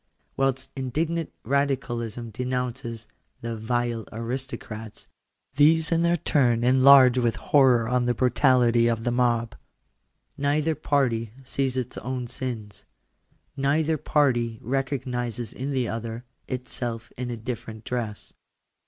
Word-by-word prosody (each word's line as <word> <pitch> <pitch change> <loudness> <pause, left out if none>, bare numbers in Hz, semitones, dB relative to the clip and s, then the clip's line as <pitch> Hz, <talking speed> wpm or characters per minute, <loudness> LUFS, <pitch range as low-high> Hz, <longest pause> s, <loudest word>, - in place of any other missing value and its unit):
Whilst 135 -1 0
indignant 155 +5 -2
Radicalism 120 -4 -1
denounces 125 -1 -3 0.2
" - - -44
the 115 0 -4
vile 115 -1 -2
aristocrats," 115 -2 -6 0.5
these 160 +3 +4
in 165 0 +3
their 170 0 +3
turn 120 -7 +2
enlarge 130 0 +7
with 120 -2 +1
horror 130 -5 +4
on 125 0 +1
the 120 - +1
brutality 125 -2 +3
of 115 -1 0
the 120 - 0
mob. 120 -2 +1 0.9
Neither 150 +3 +1
party 125 -8 0
sees 130 0 -1
its 125 -1 -3
own 125 +1 -4
sins. 115 -4 -6 0.7
Neither 150 +3 +1
party 120 -7 +1
recognises 125 -2 -2
in 130 +2 -4
the 130 -4 0
other, 115 +1 -5 0.2
itself 120 -2 -4
in 125 0 -4
a 120 - -4
different 110 -1 -6
dress. 115 -4 -4
125 Hz, 120 wpm, -25 LUFS, 115-135 Hz, 0.9 s, enlarge